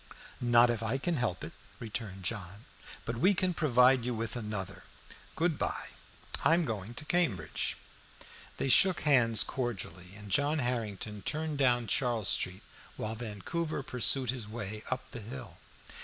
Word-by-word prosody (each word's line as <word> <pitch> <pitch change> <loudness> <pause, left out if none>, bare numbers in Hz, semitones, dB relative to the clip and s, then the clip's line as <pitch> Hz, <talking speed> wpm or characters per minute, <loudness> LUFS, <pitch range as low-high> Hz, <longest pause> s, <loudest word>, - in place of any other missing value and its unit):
"Not 120 0 +5
if 115 -2 -2
I 115 +4 0
can 165 +4 -1
help 105 -9 -1
it," - - -7 0.3
returned 105 -4 -5
John. 100 +1 -4 0.4
"But 115 0 -3
we 190 - +4
can 185 -1 +2
provide 130 -5 +4
you 125 0 -1
with 115 +2 -3
another. 105 -5 -4 0.5
Good 165 -2 +1
by. - - -1 0.5
I 165 - +6
am 170 -1 +1
going 110 -1 -4
to 150 - -6
Cambridge." 140 - 0 0.8
They - - -1
shook 185 +8 +7
hands 120 -7 +4
cordially, 100 -7 -4
and 105 -1 -10
John 145 +8 +2
Harrington 110 -5 -3
turned 155 +1 -2
down 120 -3 +3
Charles 115 -3 +1
Street, 95 +3 +1 0.3
while 110 - -3
Vancouver 125 - -4
pursued 125 0 +1
his 125 -5 -6
way 105 -1 -6
up 130 0 -3
the 120 - -7
hill. 115 -5 -9
120 Hz, 155 wpm, -31 LUFS, 105-135 Hz, 0.8 s, shook